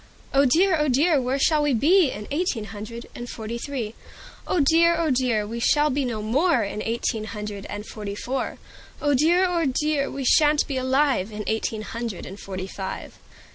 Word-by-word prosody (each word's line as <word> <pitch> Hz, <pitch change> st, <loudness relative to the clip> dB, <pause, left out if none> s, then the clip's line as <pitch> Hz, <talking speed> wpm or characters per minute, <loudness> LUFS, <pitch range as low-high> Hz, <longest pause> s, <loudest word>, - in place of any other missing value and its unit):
"Oh 275 Hz, +1 st, +5 dB
dear! 345 Hz, +8 st, +4 dB
oh 300 Hz, -, +2 dB
dear! 290 Hz, +3 st, +3 dB
where 255 Hz, +2 st, -1 dB
shall 300 Hz, +2 st, +3 dB
we 290 Hz, -3 st, +2 dB
be 320 Hz, -, +4 dB
In 210 Hz, -3 st, -7 dB
eighteen 290 Hz, -7 st, -1 dB
hundred 215 Hz, +3 st, -8 dB
and 240 Hz, 0 st, -7 dB
forty 225 Hz, +1 st, -5 dB
three? 240 Hz, -5 st, -4 dB, 0.5 s
"Oh 365 Hz, -, +1 dB
dear! 330 Hz, +4 st, +4 dB
oh 330 Hz, -3 st, +1 dB
dear! 245 Hz, -5 st, +1 dB
we 230 Hz, +3 st, -5 dB
shall 295 Hz, +5 st, +3 dB
be 275 Hz, +1 st, 0 dB
no 225 Hz, -4 st, -3 dB
more 265 Hz, +3 st, +2 dB
In 210 Hz, +1 st, -4 dB
eighteen 225 Hz, -1 st, -2 dB
hundred 210 Hz, -2 st, -6 dB
and 205 Hz, +1 st, -6 dB
forty 210 Hz, -2 st, -6 dB
four, 260 Hz, +5 st, -3 dB, 0.4 s
"Oh 290 Hz, -1 st, +1 dB
dear! 335 Hz, +7 st, +4 dB
oh 340 Hz, -2 st, 0 dB
dear! 285 Hz, +1 st, 0 dB
we 275 Hz, -1 st, -5 dB
sha'n't 300 Hz, +2 st, +4 dB
be 275 Hz, -, -2 dB
alive 260 Hz, -5 st, +1 dB
In 210 Hz, 0 st, -5 dB
eighteen 220 Hz, 0 st, -2 dB
hundred 230 Hz, -3 st, -5 dB
and 195 Hz, +2 st, -9 dB
forty 185 Hz, -1 st, -5 dB
five." 190 Hz, 0 st, -7 dB
255 Hz, 190 wpm, -24 LUFS, 215-295 Hz, 0.5 s, Oh